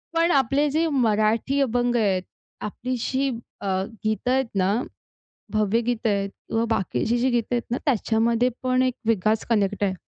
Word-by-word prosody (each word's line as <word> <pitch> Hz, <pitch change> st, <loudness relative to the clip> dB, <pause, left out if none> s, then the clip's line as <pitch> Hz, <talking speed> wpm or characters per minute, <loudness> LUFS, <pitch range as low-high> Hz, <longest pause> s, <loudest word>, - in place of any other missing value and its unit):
पण 335 Hz, +1 st, +3 dB
आपले 275 Hz, +2 st, +2 dB
जे 325 Hz, +3 st, +2 dB
मराठी 230 Hz, +1 st, +2 dB
अभंग 245 Hz, -1 st, +1 dB
आहेत, 195 Hz, -5 st, +2 dB, 0.4 s
आपली 250 Hz, +5 st, -3 dB
जी 270 Hz, +1 st, 0 dB, 0.3 s
अ, 200 Hz, -, -4 dB, 0.4 s
गीतं 220 Hz, +3 st, 0 dB
आहेत 265 Hz, 0 st, +2 dB
ना, 195 Hz, +1 st, +2 dB, 0.8 s
भावगीत 225 Hz, +2 st, +1 dB
आहेत 200 Hz, -1 st, 0 dB, 0.2 s
किंवा 225 Hz, +1 st, 0 dB
बाकीची 215 Hz, -, 0 dB
जी 260 Hz, +2 st, +2 dB
गीत 240 Hz, -2 st, +1 dB
आहेत 240 Hz, -1 st, +1 dB
ना, 245 Hz, -, 0 dB
त्याच्यामध्ये 235 Hz, -1 st, +2 dB
पण 255 Hz, 0 st, +2 dB
एक 255 Hz, -1 st, +1 dB
विकास 215 Hz, 0 st, +2 dB
कनेक्ट 205 Hz, -2 st, +1 dB
आहे. 190 Hz, -, 0 dB
235 Hz, 155 wpm, -24 LUFS, 215-255 Hz, 0.8 s, पण